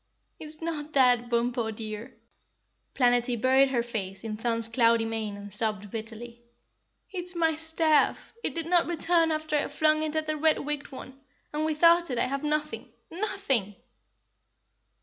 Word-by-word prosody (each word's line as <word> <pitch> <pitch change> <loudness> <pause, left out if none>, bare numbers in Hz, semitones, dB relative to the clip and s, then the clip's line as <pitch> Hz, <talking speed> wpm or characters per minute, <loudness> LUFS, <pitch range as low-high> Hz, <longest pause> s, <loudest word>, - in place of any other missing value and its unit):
"It's 310 0 -10
not 310 -2 -4
that, 245 -3 +4
Bumpo, 235 -1 0
dear." 215 0 -7 0.8
Planetty 245 -1 +2
buried 265 +3 +4
her 240 -3 0
face 195 -5 -5
in 220 -1 -4
Thun's 230 0 -1
cloudy 230 -1 +3
mane 220 -2 -4
and 205 -1 -9
sobbed 210 -2 -2
bitterly. 230 +1 -7 0.7
"It's 360 -1 -5
my 325 -2 +2
staff! 320 -1 +1
It - - -2
did 330 -1 -3
not 345 0 +3
return 335 -1 +2
after 310 0 -2
I 290 - +1
flung 310 +1 +2
it 310 0 -3
at 315 0 0
the 310 0 -2
red 315 +1 +3
wigged 295 0 -4
one, 265 0 -10 0.3
and 305 +1 -1
without 335 +2 +4
it 250 - -2
I - - +2
have 275 +2 -3
nothing, 300 0 -2 0.2
NOTHING!" 335 - -1
270 Hz, 155 wpm, -27 LUFS, 230-315 Hz, 0.8 s, that